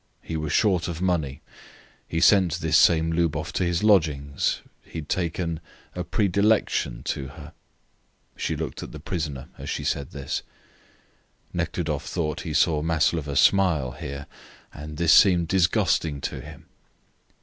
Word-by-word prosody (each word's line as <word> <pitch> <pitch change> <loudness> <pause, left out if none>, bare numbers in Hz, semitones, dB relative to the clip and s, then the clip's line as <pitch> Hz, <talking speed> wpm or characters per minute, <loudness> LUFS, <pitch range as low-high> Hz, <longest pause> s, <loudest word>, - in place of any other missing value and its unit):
He 80 - -5
was 75 -2 -3
short 95 -6 +2
of 85 -2 -4
money. 80 -7 -1 0.6
He 80 - -2
sent 95 -4 +5
this 80 -2 0
same 80 0 +5
Lubov 80 0 0
to - - 0
his 85 +2 0
lodgings. 75 -9 +2 0.2
He - - -10
had 75 -2 -6
taken 85 -2 -1 0.3
a 90 - -3
"predilection" 100 - +1
to 70 - -3
her. 75 +3 -11 0.8
She - - -2
looked - - -5
at - - -8
the 75 - -7
prisoner 75 -5 -4
as - - -6
she - - -3
said 70 -2 -2
this. - - -4 1.1
Nekhludoff 75 -5 -2
thought 75 -1 -2
he 80 -3 -5
saw 80 -3 +3
Maslova 80 -2 0
smile 80 -7 +3
here, 70 +2 -7 0.5
and 75 +1 -8
this 85 -1 +4
seemed 90 -4 +6
disgusting 85 -4 +2
to - - -4
him. - - -12
80 Hz, 145 wpm, -25 LUFS, 75-90 Hz, 1.1 s, seemed